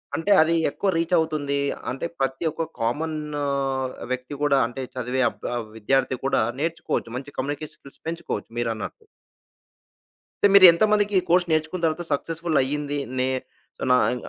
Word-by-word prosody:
అంటే 200 +5 -1
అది 165 +1 +3
ఎక్కువ 195 +7 -1
రీచవుతుంది. 160 -4 +1 0.3
అంటే 135 - -4
ప్రతి 135 +3 -1
ఒక్క 160 +1 -3
కామను 150 +4 -2 0.7
వ్యక్తి 130 +2 -3
కూడా 140 -2 +4
అంటే 125 +2 -7
చదివే 125 +1 -1
అబ 120 - -5 0.2
విద్యార్థి 130 +4 +1
కూడా 135 - +2 0.2
నేర్చుకోవచ్చు. 165 -6 -2
మంచి 140 +2 -9
కమ్యూనికేషన్ 145 +3 -4
స్కిల్స్ 140 - -17
పెంచుకోవచ్చు 165 -11 -4
మీరన్నట్టు. 115 - -4 1.4
అంటే 205 - +7
మీరు 200 -1 +10
ఎంతమందికి 210 +3 +2
ఈ - - +7
కోర్స్ 175 +1 +4
నేర్చుకున్న 155 +3 0
తర్వాత 160 +2 0
సక్సెస్‌ఫుల్ 165 +2 -1
అయ్యింది 145 +2 -2 0.2
నే 130 0 +2 0.6
నా 125 - +6 0.2
ఇ - - -2
150 Hz, 140 wpm, -24 LUFS, 135-165 Hz, 1.4 s, మీరు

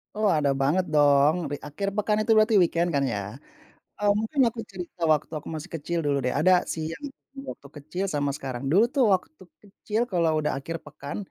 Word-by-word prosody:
Oh, 210 -1 +2
ada 150 -3 +2
banget 165 +7 +2
dong, 145 0 +5 0.2
bi - - -1
akhir 150 +7 -5
pekan 210 0 +1
itu 225 - 0
berarti 215 +1 +4
weekend, 170 0 +1
kan 140 - +2
ya, 120 -6 -1 0.8
eee, 205 0 +3
mungkin 225 +6 0
aku 230 0 -4
cerita 180 -2 -9
waktu 150 0 -2
aku 150 - -10
masih 155 +3 -6
kecil 170 +2 -3
dulu 145 -1 +1
deh, 125 - 0
ada 185 +5 +4 0.2
sih, 160 - -4
yang 295 - -11 0.3
di - - -8
waktu - - -9
kecil 175 +7 -4
sama 145 -5 -1
sekarang. 130 -2 -6
Dulu 195 +7 +5
tuh 270 - +4
waktu 185 -2 -1 0.2
kecil 210 +2 -3
kalau 165 -3 +2
udah 150 0 0
akhir 165 +5 -5
pekan, 140 +1 -7
165 Hz, 200 wpm, -26 LUFS, 145-200 Hz, 0.8 s, dong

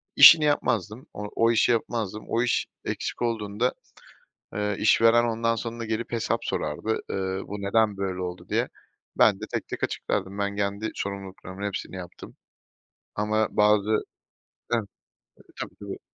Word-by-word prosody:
İşini 155 -2 +10
yapmazdım, 115 -5 0
o 105 - -6
o 115 0 +4
işi 120 +1 +4
yapmazdım. 110 -2 -2
O 115 - +1
iş, 125 - +1 0.2
eksik - - -3
olduğunda, 115 0 0 0.8
eee, 105 0 0
işveren 115 +2 +5
ondan 115 0 +1
sonra 115 0 -4
gelip 110 +1 -3
hesap 115 -2 0
sorardı, 75 +9 -1
eee, - - -2 0.3
"Bu 100 0 -5
neden 105 0 +2
böyle 95 -2 -2
oldu?" 90 0 -6
diye. - - +1 0.5
Ben - - +5
de - - -3
tek - - -2
tek - - -5
açıklardım, 100 0 -2
ben 100 0 -1
kendi 100 +2 -1
sorumluluklarımın 100 0 -6
hepsini 95 -1 -5
yaptım 90 -1 -9 0.8
ama 105 +1 +1
bazı 105 0 +3
E 110 - -2 1.4
Tabii, - - -6
tabii. - - -6
105 Hz, 140 wpm, -26 LUFS, 100-115 Hz, 1.4 s, İşini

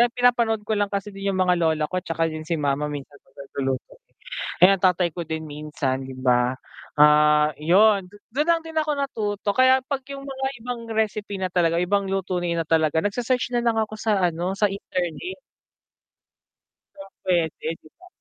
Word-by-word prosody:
pinapanood 235 -3 +2
ko 220 - -1
lang 205 - +2
kasi 200 +1 -3
din 195 0 -3
yung - - -2
mga 180 0 +3
lola 160 -2 +2
ko 185 - 0
'tsaka 165 0 -1
yun 155 0 -6
si 170 - 0
mama 145 0 0
minsan 145 0 -8
'pag 135 - -31
nagluluto, 135 -2 -3 0.7
eh, 185 - +9
ang 195 -1 +1
tatay 180 -1 +3
ko 175 - -3
din 160 -1 -4
minsan 145 -3 -3
'di 130 - -8
ba, 125 0 +2 0.4
ah, 150 0 +6
yun, 195 +4 +4 0.3
dun 295 +4 0
lang 335 -1 +3
din 320 0 -9
ako 305 -1 +1
natuto 210 -7 -2
kaya 260 0 +5
'pag 280 -2 -2
yung 275 0 -8
mga 265 -1 -3 0.2
ibang 245 -1 -4
recipe 210 -2 -1
na 185 -1 -2
talaga 170 -2 +2
ibang 200 +2 +1
luto 190 -2 -1
na 170 -1 -1
talaga 160 -1 +2
nagse-search 245 +4 -1
na 240 - +2
lang 230 -1 +2
ako 215 0 -1
sa 215 -2 +1
ano 175 +4 -3
sa 210 - +4
internet. 195 - -4 1.5
Yun, 195 0 -12
puwede 170 -4 0
'di 155 - -18
ba? 365 - -17
185 Hz, 180 wpm, -24 LUFS, 155-220 Hz, 1.5 s, eh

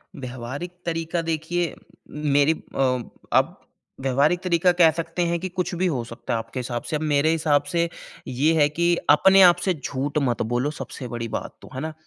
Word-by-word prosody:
व्यावहारिक 130 +5 -6
तरीका 165 0 -1
देखिए, 165 +2 -1 0.6
मेरी 145 +2 +5 0.2
अ, 125 -2 +1 0.3
आप - - +2 0.4
व्यावहारिक 140 +6 +2
तरीका 180 0 +3
कह 165 -2 +8
सकते 165 +2 -3
हैं 170 - 0
कि 185 +2 -4
कुछ 180 0 -3
भी 185 - +3
हो 130 -8 -1
सकता 115 0 -5
है 115 - +1
आपके 115 +3 -6
हिसाब 120 -1 -4
से, - - -3
अब 150 - -2
मेरे 145 +2 +3
हिसाब 150 -3 +2
से 170 0 +2 0.4
ये 140 +6 +2
है 145 - +6
कि 170 0 +4 0.2
अपने 195 +2 +6
आप - - -4
से 185 - +2
झूठ 140 0 -3
मत 120 - -1
बोलो 135 +5 0
सबसे 130 - -7
बड़ी 120 0 -4
बात - - -8
तो, - - -13
है - - -3
ना? 160 +1 -4
155 Hz, 195 wpm, -24 LUFS, 130-170 Hz, 0.6 s, कह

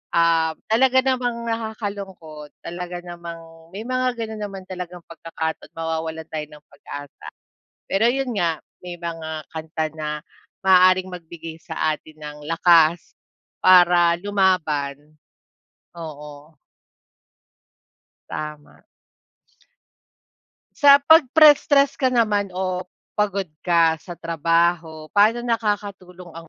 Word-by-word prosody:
Ah, 165 -1 +3 0.2
talaga 260 +3 +4
namang 245 -3 -1
nakakalungkot, 200 -9 -6
talaga 175 +1 -6
namang 165 -2 -10
may 210 - -5
mga 255 0 -1
ganun 220 -1 -6
naman 195 -2 -6
talagang 180 -1 -7
pagkakataon, 165 -1 -6
mawawalan 160 0 -4
tayo 155 -1 -4
ng 150 0 -16
pag-asa. 145 0 -10 0.6
Pero 215 +4 +3
yun 265 0 -1
nga, 170 -3 +1 0.2
may 180 -1 -8
mga 165 -2 -6
kanta 160 0 -4
na 155 -1 -5 0.6
maaaring 185 0 +5
magbigay 165 -1 -9
sa 160 -2 -1
atin 155 0 -15
ng 150 0 -8
lakas 165 0 +4 0.5
para 175 -2 +6
lumaban. 155 -7 0 0.8
Oo. 150 -1 -10 1.8
Tama. 150 -1 -8 1.9
Sa 285 -2 +8
pagpress 310 -1 +6
stress 280 -1 +4
ka 260 - +3
naman 215 -5 +1
o 185 -1 -1 0.3
pagod 200 -2 -1
ka 165 -2 +2
sa 175 +1 -9
trabaho, 165 0 0
pa'no 220 +4 +3
nakakatulong 200 -6 -3
ang 165 -1 -11
175 Hz, 105 wpm, -22 LUFS, 160-205 Hz, 1.9 s, Sa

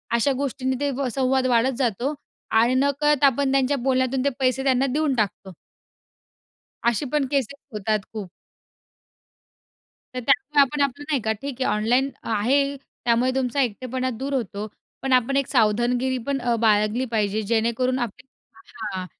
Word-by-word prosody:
अशा 235 +4 +2
गोष्टींनी 260 -1 -2
ते 285 0 0
व 275 -1 -1
संवाद 265 -1 +1
वाढत 245 +1 +3
जातो 250 +2 0 0.5
आणि 240 +2 +3
नकळत 280 +2 +2
आपण 275 0 +3
त्यांच्या 275 +1 +2
बोलण्यातून 260 0 0
ते - - +4
पैसे 260 0 +1
त्यांना 265 -1 +2
देऊन 300 -2 +1
टाकतो. 200 -4 -2 1.3
अशी 235 +4 +1
पण 295 -2 +2
केसेस 280 -1 0 0.2
होतात 215 +1 0
खूप. 210 -4 -6 1.9
तर - - -6
त्यामुळे 300 -9 +3
आपण 285 +2 +1
आपलं 280 +1 -1
नाही 280 -5 +1
का 220 - 0
ठीक 275 -2 -6
आहे - - +2
ऑनलाईन 245 +6 +2
आहे, 270 +6 +1
त्यामुळे 245 -2 -1
तुमचा 265 +1 0
एकटेपणा 255 +2 -2
दूर 275 +3 -4
होतो. 215 -5 -3 0.3
पण 270 -1 0
आपण 255 +2 +3
एक 275 -1 +1
सावधानगिरी 245 +2 +1
पण 280 -1 0
अ, 240 -1 +1
बाळगली 215 +2 +2
पाहिजे 215 -1 0
जेणेकरून 235 +4 0
आपली 240 +1 -5 0.7
हां. 185 -1 -4
255 Hz, 150 wpm, -23 LUFS, 230-275 Hz, 1.9 s, ते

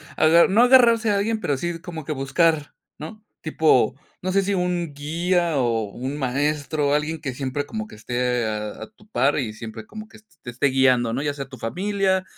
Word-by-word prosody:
aga 165 +2 +5
no 205 +5 +3
agarrarse 240 -3 +5
a 200 - +2
alguien, 220 +2 -1
pero 145 -8 0
sí 175 +3 -3
como 165 -4 -8
que 155 - -2
buscar, 150 +2 +1 0.2
¿no?, 210 +8 -9 0.2
tipo, 150 -7 +2 0.3
no 185 - -2
sé 195 +1 +3
si 200 +1 -1
un 180 -4 -1
guía 165 +3 0
o 115 -4 +1
un 130 +6 -5
maestro, 145 +2 -1
alguien 150 +2 -1
que 135 -5 -4
siempre 135 +2 -3
como 215 +8 -5
que - - -13
esté 125 +1 -1
a 105 -1 -4
a - - -8
tu 210 -1 -23
par 140 - +1
y 120 -6 -2
siempre 110 0 -9
como 215 - -10
que - - -16
es 215 - -22 0.2
te 120 - -8
esté 125 +4 +1
guiando, 130 -3 +3
¿no?, 130 - -2
ya 145 0 -1
sea 140 -2 -7
tu 130 - -10
familia, 190 - -1
150 Hz, 210 wpm, -23 LUFS, 130-185 Hz, 0.3 s, aga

